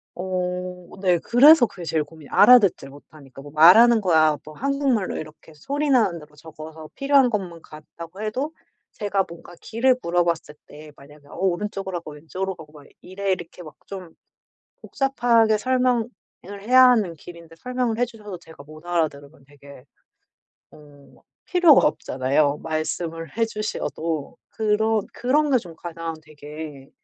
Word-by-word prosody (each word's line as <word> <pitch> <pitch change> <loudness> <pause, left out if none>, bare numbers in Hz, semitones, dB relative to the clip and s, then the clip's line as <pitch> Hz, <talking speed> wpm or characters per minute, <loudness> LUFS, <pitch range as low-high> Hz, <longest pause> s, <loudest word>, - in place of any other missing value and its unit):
어 180 -1 -4
네. 180 -3 +3
그래서 255 - +6
그게 185 -5 -10
제일 160 -1 0
고민이에요, 150 -1 -16
알아듣질 205 - +5
못하니까. 140 -1 -15
뭐 145 +1 -12
말하는 220 +10 +7
거야 160 -6 +3
뭐 155 - -11
한국말로 270 - -1
이렇게 155 +1 -11
소리 285 - -3
나는 220 -10 +2
대로 150 -1 -17
적어서 155 +1 -11
필요한 275 -2 +3
것만 180 -6 -4
갔다고 165 +4 -12
해도 255 +9 -3 0.4
제가 200 -3 -1
뭔가 170 +1 -13
길을 250 +3 +1
물어봤을 170 -3 -1
때 150 0 -13
만약에 145 +1 -17
어 - - -15
"오른쪽으로 190 0 -2
가고 160 -2 -11
왼쪽으로 185 +6 -5
가고 155 -3 -14
막 145 -2 -15 0.2
이래." 195 +1 -4
이렇게 180 -1 -5
막 155 - -12
좀 185 -4 -9 0.7
복잡하게 235 -5 +1
설명을 250 -1 +1 0.5
해야 255 +4 +6
하는 210 -8 +1
길인데 170 +1 -13
설명을 250 +2 -3
해 - - +4
주셔도 215 -5 -10
제가 160 -3 -15
못 155 +2 -14
알아들으면 155 -4 -3
되게 140 -2 -16 0.9
어 145 -4 -19 0.2
필요가 350 -6 +5
없잖아요, 140 +1 0
말씀을 165 +1 -4
해 230 - +2
주셔도. 170 -8 -4
그런 220 0 0
그런 290 +5 +1
게 260 - +5
좀 175 -8 -8
가장 165 -1 -6
되게 150 -2 -10
175 Hz, 325 characters per minute, -22 LUFS, 155-225 Hz, 0.9 s, 말하는